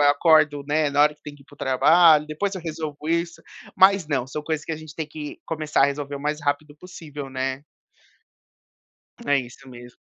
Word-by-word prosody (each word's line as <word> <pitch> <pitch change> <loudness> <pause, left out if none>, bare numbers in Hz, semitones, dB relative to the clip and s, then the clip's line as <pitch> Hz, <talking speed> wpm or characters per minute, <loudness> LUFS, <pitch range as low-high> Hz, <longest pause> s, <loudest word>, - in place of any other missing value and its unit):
acordo, 150 -1 +3
né, 150 0 +1
na 140 +1 +1
hora 150 0 +3
que - - -37
tem 145 -1 -9
que 145 - -18
ir - - -25
pro 145 - -18
trabalho, 150 +4 +4
depois 195 +7 -3
eu 185 - -6
resolvo 155 -2 -6
isso", 170 +1 -2 0.3
mas 190 -2 +5
não 130 -4 -1
são 150 +3 -6
coisas 155 0 -3
que 160 - -4
a - - -3
gente 155 -1 -11
tem 160 -1 -4
que 150 -1 -8
começar 155 -3 0
a - - +7
resolver 140 0 -4
o - - -9
mais 150 +1 -2
rápido 145 +1 -2
possível, 150 -5 -9
né. 130 +1 -3 1.7
É 145 - +5
isso 125 +2 -11
mesmo. 120 0 -13
150 Hz, 200 wpm, -23 LUFS, 140-160 Hz, 1.7 s, a